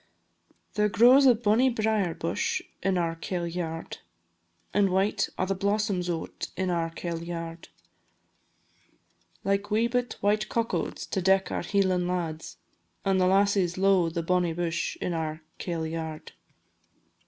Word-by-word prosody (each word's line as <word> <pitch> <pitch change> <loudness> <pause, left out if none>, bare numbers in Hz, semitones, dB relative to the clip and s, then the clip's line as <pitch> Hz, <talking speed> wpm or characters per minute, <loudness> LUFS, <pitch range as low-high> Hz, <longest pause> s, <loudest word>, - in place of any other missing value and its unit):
There 210 0 +2
grows 245 +8 +6
a 250 - +7
bonnie 230 +3 +3
brier 215 -7 0
bush 165 - -1 0.2
in 190 0 +1
our 165 -1 0
kail 170 +1 -3
yard, 165 -1 -5 0.7
And 200 0 +3
white 195 +2 +1
are 185 - +1
the 195 - 0
blossoms 200 -2 0
o't 165 -2 -4
in 185 0 0
our 165 -1 0
kail 165 0 -5
yard, 165 -1 -6 1.8
Like 200 +1 0
wee 220 +2 +2
bit 245 0 -1
white 215 +1 0
cockauds 230 -1 -2
to 190 - 0
deck 190 +1 +3
our - - -1
Hieland 185 -1 +1
lads, 165 -3 -3 0.5
And 190 -1 +2
the 185 - +4
lasses 195 -2 +3
lo'e 190 -3 +3
the 165 +1 -2
bonnie 180 -1 +1
bush 170 0 -2
in 180 - -2
our 160 -1 -3 0.2
kail 170 -3 -3
yard. 160 -1 -5
185 Hz, 140 wpm, -27 LUFS, 170-205 Hz, 1.8 s, a